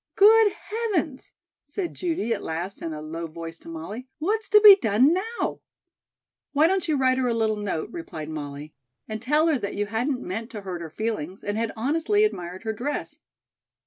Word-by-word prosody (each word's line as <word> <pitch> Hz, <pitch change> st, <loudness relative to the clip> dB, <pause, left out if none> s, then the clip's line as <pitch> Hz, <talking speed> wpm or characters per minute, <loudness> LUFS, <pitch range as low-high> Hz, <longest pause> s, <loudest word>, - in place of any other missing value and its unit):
"Good 435 Hz, 0 st, +7 dB
heavens!" 405 Hz, -, -3 dB, 0.3 s
said 345 Hz, +4 st, -4 dB
Judy 320 Hz, -, -1 dB
at 205 Hz, -, -4 dB
last 175 Hz, +5 st, -4 dB
in 165 Hz, -, -3 dB
a 155 Hz, -1 st, -6 dB
low 165 Hz, +2 st, -5 dB
voice 165 Hz, +1 st, -8 dB
to -, -, -12 dB
Molly, 190 Hz, +10 st, -7 dB
"what's 410 Hz, +6 st, -1 dB
to 420 Hz, -, +8 dB
be 415 Hz, -2 st, +11 dB
done 255 Hz, -, +3 dB
now?" 445 Hz, +6 st, -2 dB, 0.9 s
"Why 300 Hz, +2 st, +5 dB
don't 375 Hz, +2 st, +1 dB
you 305 Hz, -2 st, +2 dB
write 260 Hz, -1 st, +3 dB
her 255 Hz, -, +1 dB
a 235 Hz, -, +1 dB
little 220 Hz, -1 st, +1 dB
note," 200 Hz, -6 st, -3 dB
replied 175 Hz, -, -7 dB
Molly, 150 Hz, -1 st, -6 dB, 0.3 s
"and 215 Hz, 0 st, -5 dB
tell 300 Hz, +5 st, +3 dB
her 315 Hz, -5 st, +2 dB
that 200 Hz, -2 st, -4 dB
you 205 Hz, -, 0 dB
hadn't 245 Hz, +5 st, -1 dB
meant 225 Hz, +6 st, -4 dB
to 210 Hz, -, -5 dB
hurt 185 Hz, -3 st, -5 dB
her 165 Hz, -, -6 dB
feelings 195 Hz, -2 st, -4 dB
and 205 Hz, -, -2 dB
had 225 Hz, 0 st, -1 dB
honestly 325 Hz, -, +2 dB
admired 180 Hz, -, -2 dB
her 220 Hz, -1 st, -2 dB
dress." 260 Hz, +7 st, -4 dB
230 Hz, 190 wpm, -25 LUFS, -, 0.9 s, be